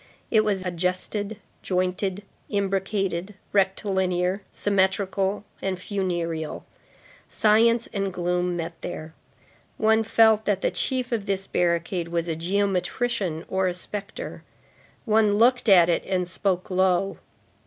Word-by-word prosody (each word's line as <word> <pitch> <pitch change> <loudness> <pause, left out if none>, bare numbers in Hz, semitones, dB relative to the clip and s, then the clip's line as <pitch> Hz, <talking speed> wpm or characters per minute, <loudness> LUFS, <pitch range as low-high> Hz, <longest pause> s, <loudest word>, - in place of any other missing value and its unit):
It 220 -2 +5
was 195 -3 -1
adjusted, 185 +4 -2 0.2
jointed, 185 +1 -1 0.3
imbricated, 195 -1 -1 0.2
rectilinear, 190 -1 +1
symmetrical 195 0 0 0.2
and 190 -1 -2
funereal. 175 -5 -3 0.6
Science 230 +2 +3
and 195 -2 -1
gloom 180 0 -1
met 165 0 -4
there. 155 +1 -6 0.6
One 220 +1 +4
felt 220 -1 +4
that 200 -2 +1
the - - +2
chief 255 -1 -1
of 220 -4 -2
this 195 -1 -1
barricade 170 0 0
was 170 0 -2
a 165 - -1
geometrician 190 +1 -1
or 190 0 +1
a 180 - -1
spectre. 200 +2 -6 0.6
One 215 -2 +3
looked 245 +1 +4
at 175 -4 +7
it 170 - +1
and 185 -2 0
spoke 185 0 -1
low. 185 +1 +2
190 Hz, 120 wpm, -25 LUFS, 180-205 Hz, 0.6 s, at